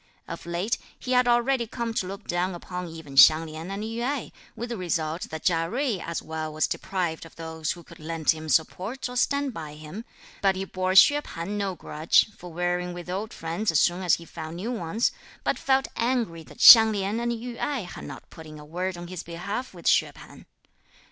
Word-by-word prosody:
Of 170 0 -7
late, 175 +6 -1 0.2
he 255 - -6
had 250 -1 +4
already 240 0 +2
come 230 +1 -3
to 185 - -1
look 200 +2 -7
down 175 +1 -1
upon 180 +1 -6
even 160 -4 -10
Hsiang 155 +3 +8
Lin 160 +2 -7
and 200 +2 -4
Yü 225 +2 -4
Ai, 270 +2 -2 0.2
with 235 +2 -5
the 235 - -3
result 165 -3 -2
that 160 0 -6
Chia 165 -1 +1
Jui 245 -6 -1
as 170 0 -4
well 160 0 -4
was 155 +1 +1
deprived 175 -4 -2
of 165 - -13
those 160 -1 -3
who 175 - -13
could - - -15
lend 160 0 +1
him 160 -1 -6
support, 190 - 0
or 250 - -8
stand 280 +1 +1
by 155 -5 -7
him; 155 +8 -8 0.4
but 195 -1 +3
he 190 +1 -3
bore 185 0 -1
Hsüeh 290 +9 +7
P'an 170 - -7
no 200 -2 -2
grudge, 160 +6 +2
for 175 0 -10
wearying 175 +1 -1
with 175 0 -7
old 205 +4 -3
friends, 170 +6 -3
as 160 - +3
soon 175 +2 +2
as 180 -3 +4
he 170 - -11
found 160 -1 -7
new 205 +8 -4
ones, 220 +1 0 0.3
but - - 0
felt 270 0 +2
angry 230 -8 0
that - - -15
Hsiang 225 -2 +11
Lin 200 +2 -1
and 235 0 -1
Yü 235 +1 -5
Ai 285 -4 -1
had 175 - -8
not - - -9
put 160 -1 -11
in 155 0 -10
a 150 - -11
word 180 +4 -3
on 175 - -7
his 180 -1 -6
behalf 200 +9 -5
with 175 -3 -13
Hsüeh - - +3
P'an. - - -14
180 Hz, 220 wpm, -26 LUFS, 165-225 Hz, 0.4 s, Hsiang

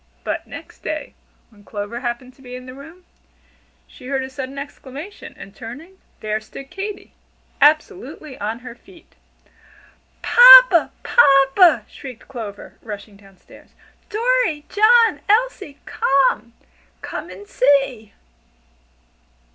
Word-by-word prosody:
But - - -4
next - - -12
day, - - -5 0.4
when 205 -2 -21
Clover 205 +3 -6
happened 245 +1 -5
to 270 - -23
be 250 -1 -10
in 255 0 -10
the 255 - -10
room, 320 +7 -14 0.8
she 250 - -15
heard 270 -1 -2
a 260 - -8
sudden 265 +1 -7
exclamation, 285 +5 -10
and 195 - -12
turning, 300 +12 -11 0.2
there 215 0 -3
stood 270 +5 -12
Katy, 400 +1 -7 0.5
absolutely 310 - 0
on 220 +3 -4
her 245 - -8
feet. 345 +7 -20 1.1
"Papa! - - +8
papa!" 275 - +4
shrieked 255 -5 -12
Clover, 220 -6 -9
rushing 205 -1 -9
down 195 -1 -20
stairs. - - -20 0.3
"Dorry, 445 -9 0
John, 455 +2 +4
Elsie 430 - 0
come! 265 -3 0 0.5
Come - - -7
and 190 +3 -12
see!" 255 -5 0
270 Hz, 120 wpm, -20 LUFS, 235-360 Hz, 1.1 s, Papa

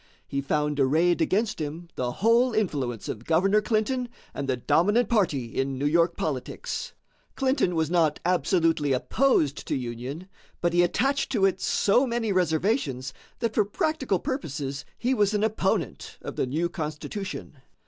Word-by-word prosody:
He 140 - -2
found 150 +1 0
arrayed 160 +6 +3
against 210 -2 +1
him 155 +3 -5
the 125 -1 -1
whole 230 - +3
influence 140 - -1
of 110 - -5
Governor 195 +8 +3
Clinton 240 +3 0 0.2
and 140 -1 -4
the 130 - +1
dominant 205 - +2
party 150 - 0
in 135 0 -1
New 140 - -2
York 170 +3 +3
politics. 140 -5 -4 0.4
Clinton 260 - +1
was 160 0 0
not 160 -4 +2
absolutely 165 -5 +2
opposed 155 - +1
to - - 0
union, 130 +7 -5 0.3
but 175 -1 0
he 175 - +5
attached 270 +11 +1
to 200 -5 +3
it 190 -1 +1
so 245 +7 +3
many 235 -3 -1
reservations 160 - 0 0.3
that 230 -2 0
for 215 - +3
practical 270 - 0
purposes 145 - -4
he 250 +2 +1
was 210 -3 +2
an 210 - +1
opponent 215 -4 -1
of - - -6
the - - 0
new 160 +7 0
Constitution. 160 +1 -6
175 Hz, 155 wpm, -26 LUFS, 145-215 Hz, 0.4 s, he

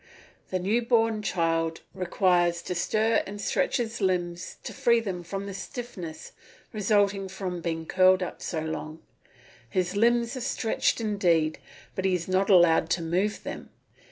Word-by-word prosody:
The 185 - 0
new 205 +6 +1
born 225 -2 +2
child 165 -4 0
requires 175 -2 +1
to - - -3
stir 215 +5 +2
and 205 +1 -7
stretch 205 - 0
his 235 -2 -3
limbs 180 -1 -1
to - - -6
free 240 -3 +3
them 190 -6 -4
from 195 +3 -5
the 200 - -6
stiffness 190 -5 -7 0.4
resulting 205 -2 +2
from 185 -2 -4
being 165 -1 -3
curled 185 +1 +4
up 180 - -6
so 160 -3 -3
long. 160 0 -5 0.7
His 185 +4 -1
limbs 235 +3 +2
are 255 - -5
stretched 225 0 0
indeed, 175 -8 +1 0.3
but 190 - -3
he 190 -1 +3
is 170 -1 -4
not 190 +2 +1
allowed 170 -4 +5
to 170 0 0
move 185 +6 -1
them. - - -7
185 Hz, 155 wpm, -27 LUFS, 175-210 Hz, 0.7 s, allowed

